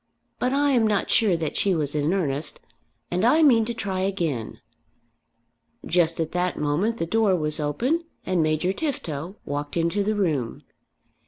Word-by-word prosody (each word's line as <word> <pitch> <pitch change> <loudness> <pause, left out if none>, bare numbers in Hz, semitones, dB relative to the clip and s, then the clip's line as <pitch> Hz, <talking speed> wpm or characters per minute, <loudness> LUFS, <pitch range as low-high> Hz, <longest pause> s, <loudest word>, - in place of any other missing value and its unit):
But 250 - +1
I 285 +1 +2
am 235 -4 +3
not 205 -2 0
sure 200 -6 +4
that 160 -3 -3
she 195 -2 +2
was 150 -3 -1
in 150 +1 0
earnest, 155 -6 -1 0.5
and 180 +2 0
I 300 +8 +5
mean 235 -7 +5
to 235 - -3
try 190 -4 -3
again." 170 - -2 1.3
Just 170 -2 +1
at 160 -1 -1
that 180 0 -1
moment 175 +11 0
the 165 - -1
door 210 +1 +2
was 155 -2 -1
opened 245 - 0 0.2
and 185 -2 +1
Major 155 +4 +1
Tifto 185 - -4
walked 145 +2 -4
into 170 +5 +1
the 215 +2 0
room. 150 - -1
180 Hz, 165 wpm, -24 LUFS, 155-215 Hz, 1.3 s, I